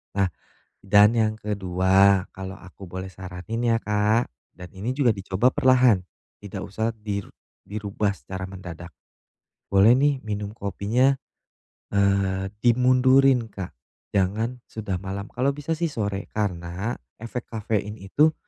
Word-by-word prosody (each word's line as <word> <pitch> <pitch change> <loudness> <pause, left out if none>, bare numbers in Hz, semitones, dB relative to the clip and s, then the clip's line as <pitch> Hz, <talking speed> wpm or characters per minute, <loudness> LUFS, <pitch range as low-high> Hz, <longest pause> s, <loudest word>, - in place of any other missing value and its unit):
Nah, 95 -2 +2 0.5
dan 105 +2 +6
yang 110 -2 +2
kedua, 95 -1 +3
kalau 95 +1 -7
aku 95 0 -12
boleh 95 +1 -6
saranin 90 +5 -6
ya, 115 - +4
Kak 105 +3 +1 0.2
dan 90 -1 -9
ini 105 +7 -3
juga 130 -6 +4
dicoba 100 +4 +1
perlahan, 125 -6 +4 0.4
tidak 100 -2 -7
usah 110 +3 -2
dir 105 -2 -4 0.4
dirubah 100 0 -1
secara 95 +7 -7
mendadak. 90 -2 -9 0.8
Boleh 100 +4 +7
nih 140 0 +2
minum 105 -1 -3
kopinya, 110 +6 +1 0.8
eee, 100 -1 +2
dimundurin, 130 +1 +5
Kak, 95 -4 -7 0.4
jangan 105 +5 0
sudah 100 -4 -4
malam. 100 +1 -5
Kalau 130 +3 +1
bisa 145 +2 -5
sih 170 - 0
sore. 100 -7 -3
Karena 95 +1 -2 0.2
efek 115 +2 -5
kafein 105 -2 -2
itu 145 +11 +2
100 Hz, 125 wpm, -25 LUFS, 95-115 Hz, 0.8 s, Boleh